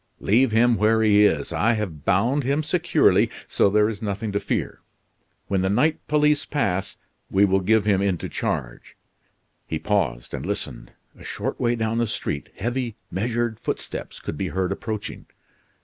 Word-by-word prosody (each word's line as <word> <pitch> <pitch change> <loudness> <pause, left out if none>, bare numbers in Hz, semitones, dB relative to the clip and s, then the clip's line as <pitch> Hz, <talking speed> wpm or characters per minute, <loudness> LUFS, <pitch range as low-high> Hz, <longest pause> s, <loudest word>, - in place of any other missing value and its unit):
"Leave 115 +4 +3
him 115 +1 +4
where 110 +1 +3
he 105 -1 +5
is. 80 -8 +1
I 115 +3 +2
have 95 -10 -4
bound 115 +10 +2
him 140 +4 0
securely, 170 +2 +3 0.2
so - - +3
there 105 +1 +3
is 110 -2 -5
nothing 105 0 -3
to 100 - 0
fear. - - -3 0.7
When 95 -2 0
the 95 - +1
night 145 +10 +2
police 150 -1 +3
pass, 95 -10 -1 0.3
we 100 +1 +4
will 95 0 +2
give 105 +2 +2
him 100 -2 +3
into 95 -4 -1
charge - - -4 0.3
" - - -46
He 80 - -2
paused 75 -11 -1
and - - -4
listened. - - -4 0.3
A - - -12
short - - -4
way 120 0 +1
down 115 0 -1
the 120 - +1
street, 70 -7 -4
heavy, 120 +1 -2 0.2
measured 115 +3 -1
footsteps - - -5
could 75 - -6
be 95 - -1
heard 95 0 -1
approaching. 110 +1 -5
105 Hz, 170 wpm, -24 LUFS, 95-120 Hz, 0.7 s, he